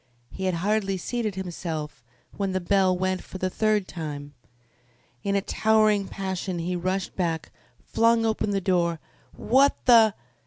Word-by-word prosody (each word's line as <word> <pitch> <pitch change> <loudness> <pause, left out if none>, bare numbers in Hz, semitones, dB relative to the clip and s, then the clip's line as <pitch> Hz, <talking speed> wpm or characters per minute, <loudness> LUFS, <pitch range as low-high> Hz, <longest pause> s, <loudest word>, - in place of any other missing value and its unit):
He 190 - -5
had 185 -2 +1
hardly 195 +2 0
seated 215 +1 -3
himself 165 -7 -5 0.3
when 195 -2 -2
the 185 - +1
bell 185 0 +2
went 185 0 -1
for - - -9
the 185 0 -2
third 215 -2 +1
time. 145 -4 -6 0.9
In 200 0 0
a 200 - +2
towering 215 -1 +2
passion 190 -1 -4
he 175 +2 -2
rushed 185 +2 -2
back, 165 -3 -2 0.3
flung 230 0 +3
open 220 -1 0
the 200 -1 0
door. 175 -3 +1 0.4
"What 270 +4 +3
the 225 -4 +6
190 Hz, 150 wpm, -25 LUFS, 175-215 Hz, 0.9 s, the